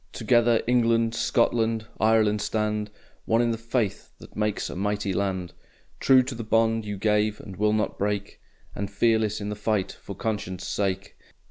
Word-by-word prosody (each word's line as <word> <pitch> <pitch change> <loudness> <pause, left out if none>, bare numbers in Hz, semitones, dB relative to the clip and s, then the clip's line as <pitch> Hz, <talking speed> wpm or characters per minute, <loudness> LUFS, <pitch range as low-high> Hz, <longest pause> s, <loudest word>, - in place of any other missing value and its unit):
Together 120 -2 +3
England, 115 -2 +2
Scotland, 115 -1 +1
Ireland 110 -1 +3
stand 105 -1 -1 0.4
One 115 - +2
in 120 -1 +2
the 115 - -2
faith 115 -3 -2
that - - -15
makes 105 -1 -1
a - - -7
mighty 100 +1 -1
land, 95 -2 -2 0.5
True 130 -1 +5
to 130 +1 -5
the 115 -1 -5
bond 115 0 +2
you 105 -1 -4
gave 105 +1 +1
and 95 - -9
will 105 +2 +2
not 110 0 -1
break 100 0 -2 0.3
And 100 0 -4
fearless 110 +1 +1
in 105 0 -4
the 105 - -3
fight 105 -2 -1
for 100 - -10
conscience' 100 -4 -3
sake! 95 -1 -2
105 Hz, 165 wpm, -26 LUFS, 100-115 Hz, 0.5 s, True